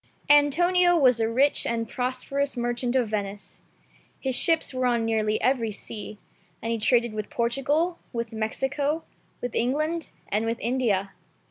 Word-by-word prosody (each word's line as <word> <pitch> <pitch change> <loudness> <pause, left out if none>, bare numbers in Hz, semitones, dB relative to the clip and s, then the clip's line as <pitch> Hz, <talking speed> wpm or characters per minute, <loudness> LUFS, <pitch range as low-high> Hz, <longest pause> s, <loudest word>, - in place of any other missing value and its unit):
ANTONIO 350 +5 +5
was 255 -6 +4
a 225 0 +1
rich 270 +5 +2
and 230 -1 -1
prosperous 260 +3 -2
merchant 240 +1 -1
of 245 -4 +2
Venice. 205 -1 -5 0.6
His 265 -2 -1
ships 325 0 +2
were 255 0 +1
on 235 -2 +1
nearly 215 -1 +1
every 240 -3 +2
sea, 210 0 -7 0.4
and 230 - -3
he 230 - -1
traded 235 0 +2
with 215 -1 -4
Portugal, 285 +9 0
with 235 -1 -4
Mexico, 270 +8 -1 0.4
with 245 -1 -4
England, 305 +7 0 0.2
and 215 +2 0
with 230 +1 -2
India. 225 -6 0
245 Hz, 145 wpm, -26 LUFS, 225-280 Hz, 0.6 s, ANTONIO